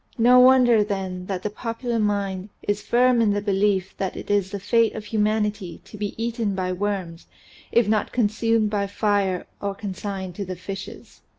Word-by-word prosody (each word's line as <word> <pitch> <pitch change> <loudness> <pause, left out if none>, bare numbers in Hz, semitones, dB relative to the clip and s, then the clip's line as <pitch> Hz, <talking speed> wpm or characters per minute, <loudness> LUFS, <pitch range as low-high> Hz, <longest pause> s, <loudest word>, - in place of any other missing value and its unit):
No 245 +2 +6
wonder 250 -3 +6
then 190 -3 -4
that 185 -2 -3
the 210 - -2
popular 230 +1 -3
mind 200 -2 -1
is 205 0 -1
firm 245 +1 +3
in 220 - +3
the 205 - 0
belief 200 -2 0
that 190 -1 -3
it - - -5
is 200 -2 +2
the 200 0 -5
fate 225 +3 +2
of 215 - -6
humanity 210 -4 -1
to - - -12
be 210 -1 -4
eaten 225 -3 -2
by 185 -1 -1
worms 185 -3 -3 0.4
if 235 -3 +3
not 215 0 +1
consumed 225 -1 +1
by 200 -1 0
fire 200 -3 0 0.2
or 200 -1 -2
consigned 195 -2 -5
to 205 - -2
the 185 -1 -5
fishes. 195 +2 -9
205 Hz, 180 wpm, -23 LUFS, 195-225 Hz, 0.4 s, No